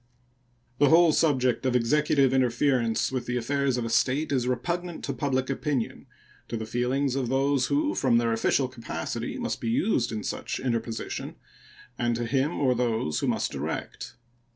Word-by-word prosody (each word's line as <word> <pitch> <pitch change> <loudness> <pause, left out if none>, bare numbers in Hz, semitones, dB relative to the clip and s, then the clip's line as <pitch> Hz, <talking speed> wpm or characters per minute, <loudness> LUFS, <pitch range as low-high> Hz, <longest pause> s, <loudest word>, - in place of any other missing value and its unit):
The 145 - +5
whole 165 0 +6
subject 130 -6 +2
of 130 -1 +1
Executive 135 +2 +3
interference 125 -2 +1
with 130 -2 -3
the 125 0 -1
affairs 135 +1 0
of 120 - -2
a - - -3
State 135 +6 +1
is 125 -3 +1
repugnant 170 +7 -2
to 140 - -2
public 130 -1 -1
opinion, 135 -3 -2 0.4
to 115 - -3
the 110 - -4
feelings 125 +4 0
of 130 -3 -1
those 135 0 +2
who, 300 +1 +1
from 125 -4 +2
their 115 -1 +1
official 130 +4 +1
capacity, 125 -2 -5
must - - -3
be 115 - -2
used 120 - +1
in 110 -2 -4
such - - -4
interposition, 115 -3 -3 0.6
and 120 -1 +1
to 120 +1 -2
him 135 +6 0
or 130 -3 +3
those 115 -10 0
who - - -1
must - - 0
direct. - - -5
130 Hz, 170 wpm, -27 LUFS, 120-140 Hz, 0.6 s, whole